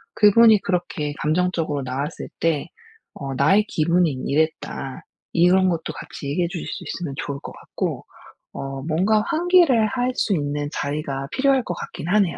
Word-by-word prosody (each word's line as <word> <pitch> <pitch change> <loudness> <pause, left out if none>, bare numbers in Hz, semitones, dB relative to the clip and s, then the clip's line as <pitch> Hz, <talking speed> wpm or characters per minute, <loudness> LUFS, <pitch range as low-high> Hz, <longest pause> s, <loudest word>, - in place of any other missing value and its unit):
그분이 215 0 +6
그렇게 175 -5 -2
감정적으로 160 -2 0
나왔을 135 +5 -4
때 165 -3 0 0.5
어 135 -1 -5
"나의 195 +11 +4
기분이 170 +1 +2
이랬다." 145 -3 -2 0.3
이런 185 +2 +4
것도 165 -2 -2
같이 140 - -8
얘기해 170 +4 0
주실 175 -3 -5
수 - - -5
있으면 170 -6 -4
좋을 140 -1 -4
것 - - -8
같고 - - -4 0.5
어 135 0 -5
뭔가 185 +8 +2
환기를 330 -10 +4
할 250 +1 -1
수 210 - +1
있는 145 -1 -2
자리가 140 -2 -3
필요할 270 -1 +2
것 180 - -3
같기는 175 +1 -5
하네요. 195 -6 +2
170 Hz, 325 characters per minute, -22 LUFS, 145-205 Hz, 0.5 s, 그분이